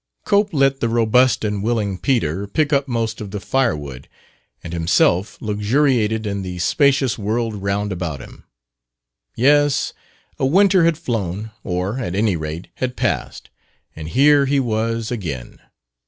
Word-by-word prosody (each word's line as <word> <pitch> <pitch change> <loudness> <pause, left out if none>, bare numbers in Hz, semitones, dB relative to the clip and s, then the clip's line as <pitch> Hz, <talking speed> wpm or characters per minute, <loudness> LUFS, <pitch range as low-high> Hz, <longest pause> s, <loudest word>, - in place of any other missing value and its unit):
Cope 205 0 +2
let 135 -2 +2
the 115 - 0
robust 115 +1 +3
and 105 -1 -2
willing 105 -4 -1
Peter 100 - 0
pick 150 +8 0
up 140 0 +2
most 115 -2 -2
of 105 - -6
the 105 +1 -5
firewood 75 - -2 0.6
and 85 - -7
himself 85 +3 +1
luxuriated 110 +1 +1
in 100 -1 -2
the 90 -1 -6
spacious 135 - +2
world 110 +2 -1
round 100 +1 -1
about 85 -6 -4
him. - - -13 0.9
Yes, 145 +3 +3 0.5
a - - +1
winter 190 +2 +4
had 165 -2 +2
flown 105 - -3
or, 90 +7 -2
at 95 -8 -3
any 105 -2 +1
rate, 80 +2 -6
had 125 -1 -2
passed - - -3 0.4
and 80 -1 -7
here 140 - +4
he 140 +1 +2
was 115 -1 -1
again. 80 - -5
110 Hz, 145 wpm, -20 LUFS, 95-135 Hz, 0.9 s, winter